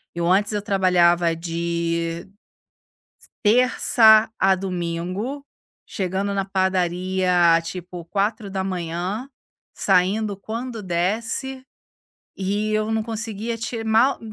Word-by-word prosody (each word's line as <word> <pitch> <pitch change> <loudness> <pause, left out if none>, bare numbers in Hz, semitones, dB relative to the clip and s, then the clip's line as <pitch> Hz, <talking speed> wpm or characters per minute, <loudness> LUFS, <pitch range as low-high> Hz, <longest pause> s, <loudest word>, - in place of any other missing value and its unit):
eu 170 0 -1
antes 205 +3 +3
eu 210 -1 -1
trabalhava 175 -4 +3
de 170 0 -2 1.0
s - - -16
terça 220 -1 +5
a 190 0 +4
domingo, 185 +8 -4 0.4
chegando 190 +1 -2
na 195 -1 -1
padaria, 185 -2 +2
tipo, 175 0 -7
4:00, 195 0 -3 0.5
saindo 200 +3 +1
quando 230 +3 -6
desse, 225 +9 -2 0.7
e 205 +3 -2
eu 215 0 0
não 220 0 0
conseguia 225 0 -4
te 225 0 -4
mal, 225 +5 +3
195 Hz, 95 wpm, -22 LUFS, 175-220 Hz, 1.0 s, terça